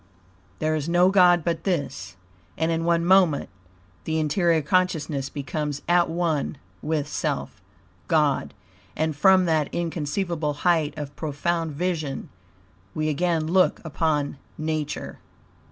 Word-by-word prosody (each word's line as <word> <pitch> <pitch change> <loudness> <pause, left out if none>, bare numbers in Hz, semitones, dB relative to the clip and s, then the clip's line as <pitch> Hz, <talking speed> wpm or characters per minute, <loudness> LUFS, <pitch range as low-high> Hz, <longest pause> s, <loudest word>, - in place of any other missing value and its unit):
There 155 0 0
is 155 +1 -2
no 175 +2 +4
God 180 -3 +5
but 165 0 -2
this, 145 - -3 0.4
and 160 +1 +1
in 165 0 -1
one 170 0 +2
moment 180 -5 +4 0.6
the 160 0 -1
interior 160 +1 +2
consciousness 155 -5 0
becomes 145 +1 -4
at 175 0 +3
one 165 -4 -1 0.2
with 150 -2 -1
self, - - -3 0.5
God, 150 -8 +1 0.4
and 155 0 -1
from 185 +4 +5
that 155 -3 +1
inconceivable 165 -1 -2
height 160 -4 +2
of 145 -1 -6
profound 160 +1 -2
vision 155 -4 -3 0.7
we 155 0 0
again 165 +1 0
look 185 +3 +3
upon 150 -3 -1 0.2
Nature. 155 -1 -3
160 Hz, 120 wpm, -24 LUFS, 150-175 Hz, 0.7 s, God